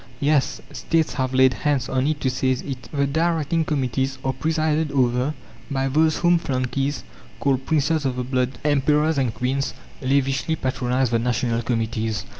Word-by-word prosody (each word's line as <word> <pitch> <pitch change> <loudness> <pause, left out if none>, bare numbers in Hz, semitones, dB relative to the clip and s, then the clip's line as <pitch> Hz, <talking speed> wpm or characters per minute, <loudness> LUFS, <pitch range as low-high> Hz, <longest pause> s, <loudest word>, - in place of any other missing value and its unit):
Yes, 145 -1 +1
States 165 -1 0
have 130 -2 -1
laid 130 0 +5
hands 140 -4 0
on 130 +1 0
it 155 -1 0
to 130 - +1
seize 130 0 0
it. 130 -3 -7
The 140 -2 +1
directing 160 +1 +1
committees 135 -2 -1
are 130 - +1
presided 155 +1 0
over 130 +2 +1 0.3
by 135 -1 0
those 155 +3 +3
whom 175 0 +3
flunkeys 135 0 -2 0.4
call 135 -2 +2
princes 150 +2 +1
of 130 -2 -1
the 125 - -2
blood. 130 0 -1
Emperors 150 +1 +2
and 130 -4 +1
queens 135 +4 -2 0.3
lavishly 135 +3 +1
patronize 130 -2 0
the 115 - +2
national 120 0 0
committees. 115 -2 -2
135 Hz, 160 wpm, -23 LUFS, 125-150 Hz, 0.4 s, laid